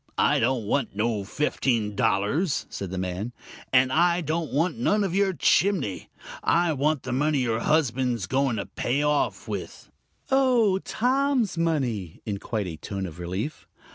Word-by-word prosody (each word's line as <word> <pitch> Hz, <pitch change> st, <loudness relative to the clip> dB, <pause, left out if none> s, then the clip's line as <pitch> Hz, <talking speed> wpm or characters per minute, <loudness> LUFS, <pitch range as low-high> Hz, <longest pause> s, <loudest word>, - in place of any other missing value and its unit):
"I -, -, +3 dB
don't 120 Hz, -1 st, +1 dB
want 120 Hz, 0 st, -1 dB
no 110 Hz, -1 st, 0 dB
fifteen 115 Hz, -2 st, -1 dB
dollars," 135 Hz, -, +1 dB
said 100 Hz, -, -5 dB
the 95 Hz, -, -5 dB
man; 95 Hz, +6 st, -3 dB, 0.4 s
"and 130 Hz, 0 st, +4 dB
I 175 Hz, +2 st, +3 dB
don't 160 Hz, 0 st, -2 dB
want 165 Hz, +6 st, +1 dB
none 210 Hz, -3 st, +2 dB
of 190 Hz, -3 st, -1 dB
your 195 Hz, 0 st, +2 dB
chinning. 170 Hz, -, +1 dB, 0.3 s
I 170 Hz, -1 st, +2 dB
want 145 Hz, 0 st, 0 dB
the 130 Hz, -, -4 dB
money 145 Hz, +4 st, +1 dB
your 115 Hz, -4 st, 0 dB
husband's 125 Hz, -, +1 dB
going 130 Hz, +3 st, +1 dB
to 100 Hz, -, -3 dB
pay 135 Hz, +4 st, -1 dB
off 150 Hz, -1 st, 0 dB
with -, -, -6 dB, 0.2 s
" -, -, -30 dB
"Oh, 245 Hz, -8 st, +4 dB
Tom's 255 Hz, -1 st, +1 dB
money!" 130 Hz, -, -1 dB
in 100 Hz, -2 st, -3 dB
quite 110 Hz, -2 st, -3 dB
a 85 Hz, -3 st, -6 dB
tone 95 Hz, +3 st, -5 dB
of 85 Hz, -2 st, -9 dB
relief. 95 Hz, -, -4 dB
135 Hz, 165 wpm, -26 LUFS, 105-170 Hz, 0.4 s, and